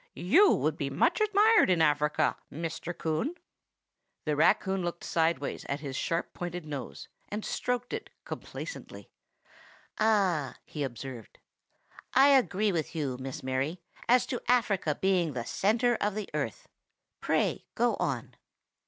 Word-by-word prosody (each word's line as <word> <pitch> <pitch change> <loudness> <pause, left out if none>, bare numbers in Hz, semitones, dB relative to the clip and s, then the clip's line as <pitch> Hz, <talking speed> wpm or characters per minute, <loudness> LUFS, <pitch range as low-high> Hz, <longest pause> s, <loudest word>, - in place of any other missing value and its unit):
You 335 - +5
would - - 0
be - - -2
much - - +2
admired 430 - +5
in 180 -2 +3
Africa, 150 -1 +2 0.2
Mr. 165 +2 -5
Coon." 160 - -1 0.9
The 150 -1 +1
raccoon 190 +4 +3
looked 175 -1 -4
sidewise 160 -4 0
at 140 +1 -2
his 140 -3 -5
sharp 165 +5 -2
pointed 175 -1 -5
nose, 140 -5 -6 0.2
and 210 +1 -4
stroked 245 0 -2
it - - -4 0.2
complacently. - - -8 0.9
"Ah!" 195 -10 +2
he 150 - -7
observed, 130 -3 -6 0.8
"I 270 +2 +7
agree 215 -7 +3
with 165 -2 -2
you, 135 -5 -2
Miss 135 +3 -6
Mary, 135 +6 -1 0.3
as 250 +1 +5
to 245 - -3
Africa 205 -10 +2
being 180 -5 +2
the 120 -2 -4
centre 235 - +2
of 205 -1 0
the 215 -2 -5
earth. 140 -7 -3 0.5
Pray - - 0
go - - +2
on." - - -2
175 Hz, 135 wpm, -29 LUFS, 150-215 Hz, 0.9 s, I